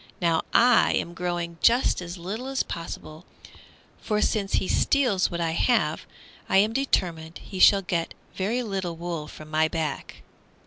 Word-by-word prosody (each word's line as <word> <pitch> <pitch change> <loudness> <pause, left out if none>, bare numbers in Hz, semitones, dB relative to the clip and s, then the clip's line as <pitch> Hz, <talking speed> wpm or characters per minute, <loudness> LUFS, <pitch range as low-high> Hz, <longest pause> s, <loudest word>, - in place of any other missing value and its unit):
Now 165 -2 +2
I 245 0 +5
am 170 - -2
growing 175 -1 -4
just 240 -4 +3
as 175 +1 -7
little 205 +9 -5
as 270 0 -1
possible, 165 -1 -8 0.8
for 210 -1 -1
since 205 -2 0
he 190 - +1
steals 245 -10 +2
what 170 - -4
I 165 -1 0
have 165 -3 +1 0.4
I - - +4
am 210 +3 +3
determined 170 -11 -1
he 190 - -9
shall 195 +1 +6
get 170 -2 -2 0.2
very 225 +6 -1
little 190 -6 -3
wool 165 -2 -5
from 155 0 -12
my 155 0 +3
back." 155 -3 -5
180 Hz, 160 wpm, -25 LUFS, 165-210 Hz, 0.8 s, shall